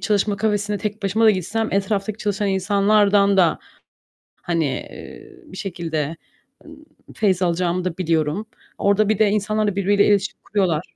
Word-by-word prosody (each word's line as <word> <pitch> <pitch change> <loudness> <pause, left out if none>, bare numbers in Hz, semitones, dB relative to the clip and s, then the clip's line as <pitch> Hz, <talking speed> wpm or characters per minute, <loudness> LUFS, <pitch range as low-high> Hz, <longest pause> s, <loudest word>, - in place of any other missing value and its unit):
çalışma 205 -1 0
kafesine 205 0 -1
tek 210 0 -5
başıma 200 +3 +1
da 220 - +7
gitsem 215 +4 -2
etraftaki 200 +1 -1
çalışan 205 -1 -1
insanlardan 200 +1 +3
da, 175 -4 +3 0.8
hani, 165 -2 -1
eee, 135 - -8
bir 190 - -12
şekilde, 165 -5 -3 0.5
ımm, 305 - -14 0.3
feyz 195 -4 +1
alacağımı 175 0 0
da 180 -3 -3
biliyorum. 165 +3 -1 0.3
Orada 200 +1 +2
bir 215 - +1
de 215 -2 +4
insanlar 215 +1 0
da, 205 - -1
birbirleriyle 200 +1 +2
iletişim 205 0 +1
kuruyorlar 185 -5 -1
200 Hz, 150 wpm, -21 LUFS, 185-210 Hz, 0.8 s, da